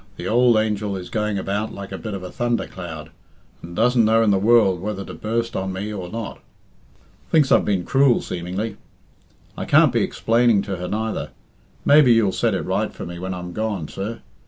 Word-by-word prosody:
The 85 - -6
ould 120 +2 +4
angel 105 -2 -1
is 90 -1 -8
going 105 -2 -1
about 100 +3 -2
like 100 -1 -8
a 95 - -4
bit 110 -3 -5
of 95 - -7
a 90 - -7
thunder 120 0 -1
cloud, 80 -4 -8 0.5
and 85 +1 -9
doesn't 120 +2 +3
know 110 +1 +4
in 105 - +3
the 95 - +3
world 105 -4 +4
whether 100 -1 -4
to - - -8
burst 115 +2 -2
on 95 0 -2
me 100 +3 -4
or 90 -4 -6
not. 115 +1 -6 0.9
Thinks 150 -5 +3
I've 115 - +5
been 95 -4 0
cruel, 135 -2 +4
seemingly. 90 +5 -4 0.8
I - - -5
can't - - +5
be - - +2
explaining 115 -3 +2
to 100 -2 -4
her 90 +1 -5
neither. 110 +3 -3 0.6
Maybe 145 -4 +6
you'll 110 -4 +3
set 110 +2 0
it - - -2
right 100 +3 -1
for - - -8
me 85 0 -7
when 95 +1 -4
I'm 90 -1 -7
gone, 105 -7 -2
sir. 110 +4 -5
105 Hz, 205 wpm, -22 LUFS, 95-115 Hz, 0.9 s, Maybe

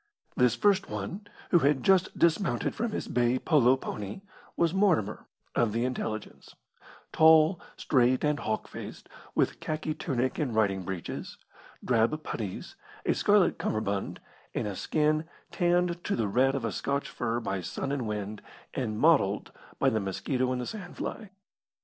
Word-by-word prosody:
This 125 -2 +3
first 200 -1 +2
one, 205 +2 -5 0.2
who 175 - +6
had 140 -3 +2
just 190 -1 +3
dismounted 170 +4 +2
from 230 0 -2
his - - -3
bay 120 +1 +2
polo 135 -4 +4
pony, 105 - -6 0.4
was 170 -1 +2
Mortimer, 170 - +1 0.3
of 115 -3 +1
the 115 +2 0
Intelligence 110 -4 -5 0.6
tall, 160 +2 +6 0.2
straight, 130 -2 +2
and 150 -1 +1
hawk 110 - -2
faced, - - -9 0.3
with - - +1
khaki 155 0 -3
tunic 130 -4 -2
and 135 -8 -1
riding 100 -3 +2
breeches, 90 -1 -6 0.5
drab 125 +6 +2
putties, 100 -5 -5 0.3
a - - +3
scarlet 205 -3 +3
cummerbund, 100 -2 -2 0.4
and - - -1
a 100 - -4
skin 155 - +1 0.3
tanned 175 0 +1
to - - 0
the 110 -3 0
red 130 +6 +2
of 130 -4 -2
a 115 - -1
Scotch 140 +8 -2
fir 120 -1 -2
by 95 -5 -3
sun 90 +10 -4
and 135 -5 -2
wind, 105 0 -4 0.3
and 110 -5 -2
mottled 105 -9 +3 0.3
by - - +3
the 110 - +1
mosquito 125 +6 -1
and 130 - -1
the 125 - -3
sand 190 - -8
fly. 215 -3 -5
130 Hz, 155 wpm, -29 LUFS, 110-160 Hz, 0.6 s, who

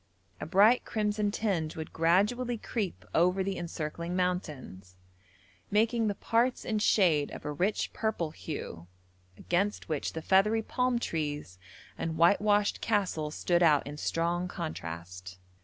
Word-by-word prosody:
A - - -5
bright 205 +8 +5
crimson 210 -1 -1
tinge 190 -7 -1
would 160 -1 -7
gradually 210 +9 +2
creep 210 -4 -4
over 180 +3 +3
the 195 0 -2
encircling 170 0 -4
mountains, 150 - -3 0.7
making 225 +2 +2
the 205 - -1
parts 235 +5 0
in 215 -2 0
shade 170 -9 +3
of - - -9
a 150 - -2
rich 185 +8 -1
purple 200 -8 -2
hue, 90 - -7 0.5
against 195 +3 -1
which 155 -3 -2
the 160 - -5
feathery 210 +4 +3
palm 250 +1 0
trees 150 - -3 0.4
and 160 -1 -3
whitewashed 205 +4 +3
castles 180 -8 -1
stood 175 -1 +1
out 155 -4 +4
in 145 +1 -6
strong 170 +3 -1
contrast. 90 - -7
180 Hz, 135 wpm, -30 LUFS, 155-210 Hz, 0.7 s, bright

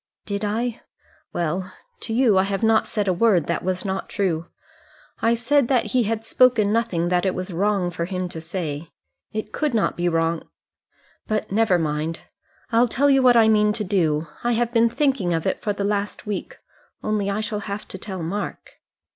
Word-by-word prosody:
"Did 200 0 -3
I? 225 +3 -2 0.5
Well, 175 +3 -2 0.3
to - - -6
you 230 -2 +4
I - - +6
have 195 +2 -2
not 220 0 +3
said 210 -3 -2
a 185 - +3
word 185 -4 +3
that 170 - -2
was 185 +2 -2
not 190 0 -3
true. 170 -4 -1 0.7
I 230 +1 +3
said 245 +3 +2
that 250 -3 +1
he 250 -3 +2
had 225 +1 -2
spoken 230 -5 +4
nothing 195 -7 0
that 180 -1 +2
it 190 -2 0
was 185 0 -5
wrong 195 0 +1
for 170 0 -3
him 185 0 -3
to 160 - -7
say. 160 -2 -4 0.4
It 215 0 -5
could 300 -6 0
not 220 - +1
be 175 0 0
wrong. 165 0 -1 0.8
But 215 -2 -2
never 210 -3 +3
mind. 155 0 -2 0.5
I'll 235 +2 +4
tell 280 +5 +2
you 270 -1 +5
what 250 -2 +6
I 225 -1 +6
mean 210 -1 +4
to 215 0 -2
do. 165 -6 +1 0.2
I 240 0 +2
have 235 +1 0
been 230 0 +4
thinking 260 - +1
of 165 - -2
it - - -1
for 210 - -1
the 200 0 -3
last 205 0 -2
week 210 -2 -4 0.5
only 210 -2 0
I 200 +1 -1
shall 215 -1 -2
have 200 +1 -5
to 190 - -7
tell 190 -4 -5
Mark." 200 +6 -4
205 Hz, 195 wpm, -23 LUFS, 180-225 Hz, 0.8 s, I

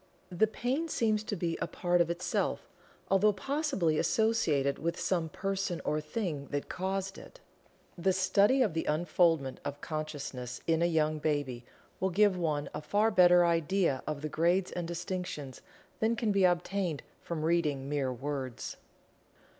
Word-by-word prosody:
The 180 +5 +3
pain 255 +9 -2
seems 215 -7 +1
to 210 - -2
be 170 -2 -2
a - - 0
part 175 -1 +1
of 170 - +1
itself, 170 +1 -1 0.4
although 205 +2 +4
possibly 200 - 0
associated 155 -12 +1
with 170 +3 -2
some 170 -4 0
person 195 0 -2
or 155 0 0
thing 150 -4 -3
that 145 0 -3
caused 190 +1 -3
it. - - -14 0.6
The 190 +2 +1
study 200 +7 +4
of 205 -9 0
the 160 - -2
unfoldment 160 -3 +1
of 145 0 -5
consciousness 145 -6 -5
in 165 0 +2
a 170 - +4
young 155 -2 +1
baby 145 -5 -1 0.3
will 190 - +1
give 200 +1 +4
one 155 -5 -1
a 150 - -4
far 210 +7 +2
better 175 -3 +6
idea 165 -3 +1
of 150 -1 -3
the - - -1
grades 175 +5 +1
and 175 -1 -4
distinctions 170 -5 -5 0.4
than 225 +1 +2
can 230 -2 0
be 195 -2 +4
obtained 175 -2 0 0.2
from 165 -2 -4
reading 150 -5 +1
mere 140 -3 -1
words. 130 -1 -5
170 Hz, 155 wpm, -31 LUFS, 150-195 Hz, 0.6 s, better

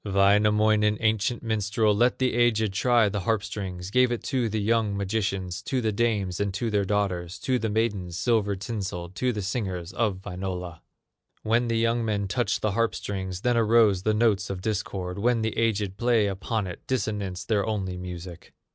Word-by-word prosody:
Wainamoinen, 105 +2 +3
ancient 110 +1 0
minstrel, 110 -1 +1
Let 120 +4 +3
the 130 -1 +1
aged 110 -4 +2
try 120 +2 +3
the 100 0 -2
harp 110 +1 0
strings, 95 -2 -5
Gave 125 +1 +4
it 120 - -3
to 125 -5 0
the 110 +1 -1
young 105 -1 +1
magicians, 95 -3 -2
To 130 - 0
the 110 -3 0
dames 100 -4 0
and 100 -1 0
to 115 +2 -1
their 100 -1 +1
daughters, 95 -3 -1
To 130 -1 +1
the 110 - -1
maidens, 105 -6 -1
silver 105 0 +1
tinselled, 95 -4 -5
To 125 -1 +1
the 105 -4 -4
singers 95 -4 -3
of 100 -5 -1
Wainola. 90 -3 -5 0.6
When 115 +2 +2
the 115 -1 0
young 115 +1 +1
men 105 -3 -1
touched 110 0 -1
the 105 - +2
harp 115 +3 +1
strings, 95 -2 -4
Then 120 0 +2
arose 110 -4 +4
the 110 +2 +1
notes 105 -3 +2
of 95 -2 -4
discord; 95 -3 -3
When 115 +1 +2
the 110 - -1
aged 105 -4 0
played 120 -4 +2
upon 100 +2 -2
it, 90 -2 -7
Dissonance 105 -6 -2
their 105 -3 +1
only 95 -4 -2
music. 90 -1 -8
105 Hz, 180 wpm, -26 LUFS, 95-115 Hz, 0.6 s, Gave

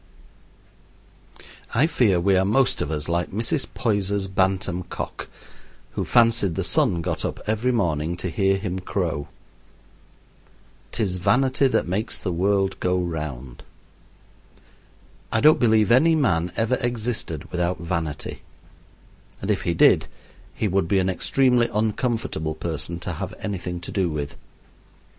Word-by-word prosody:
I 135 +7 +5
fear 110 - +2
we 95 +2 +3
are 95 - +3
most 120 +7 +2
of - - -2
us 75 -2 -3
like 85 +1 0
Mrs. 115 +6 -1
Poyser's 100 -3 0
bantam 95 -1 0
cock, 90 - -6 0.6
who - - -2
fancied 115 -7 +3
the - - -1
sun 85 -1 +2
got - - -2
up - - -3
every 110 +4 +1
morning 85 -7 0
to 90 - -3
hear 95 +3 +2
him 95 -2 -3
crow. 85 -6 -2 1.6
"'Tis 100 -5 -1
vanity 130 +7 +3
that 130 - 0
makes 100 +5 -2
the 90 - -3
world 95 +2 +1
go 90 0 +1
round." 75 -8 -5 1.7
I 110 - +2
don't 155 +5 +6
believe 110 -2 +3
any 160 +7 +5
man 90 - +1
ever 115 +3 +1
existed 115 - -3
without 90 +1 -1
vanity, 80 -4 -4 1.0
and 95 - -1
if 100 - 0
he 85 - -1
did - - +5 0.5
he 110 - 0
would 95 -2 +1
be 100 - +2
an 95 0 +2
extremely 125 +4 +2
uncomfortable 110 - -1
person 85 +1 -3
to 90 - -4
have 95 +6 -5
anything 90 -3 -4
to - - -7
do 95 -3 0
with. 75 -2 -4
95 Hz, 140 wpm, -23 LUFS, 85-110 Hz, 1.7 s, don't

